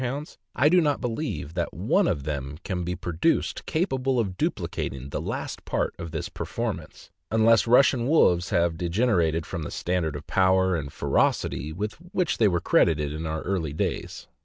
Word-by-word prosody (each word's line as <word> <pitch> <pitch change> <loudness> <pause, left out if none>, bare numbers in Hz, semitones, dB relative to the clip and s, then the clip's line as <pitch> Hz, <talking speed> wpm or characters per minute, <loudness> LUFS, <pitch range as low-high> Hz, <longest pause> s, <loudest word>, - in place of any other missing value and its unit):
hounds, 135 +4 -4 0.2
I 140 - +4
do 180 +3 +5
not 145 -3 +1
believe 115 - -3
that 85 -1 -3
one - - +2
of 70 - -1
them 70 -1 -4
can 90 -2 -3
be 90 +1 -2
produced 90 - -1
capable 135 -6 0
of 95 -5 -1
duplicating 65 -6 -3
the - - -3
last - - -4
part - - -1
of 85 - -5
this - - -4
performance, - - -5 0.2
unless 110 +1 +4
Russian 125 0 +4
wolves 90 - +4
have 85 -1 +1
degenerated 85 -4 +1
from 85 - -5
the 75 - -5
standard 85 -4 -1
of 75 - -7
power 95 -1 +3
and 70 -4 -4
ferocity 75 +2 0
with 105 +6 -3 0.2
which 180 -3 0
they 110 - +5
were 85 -3 +1
credited 75 -3 +2
in 80 +1 -4
our 80 0 -3
early 85 -6 -2
days. - - -3
90 Hz, 175 wpm, -26 LUFS, 80-120 Hz, 0.2 s, do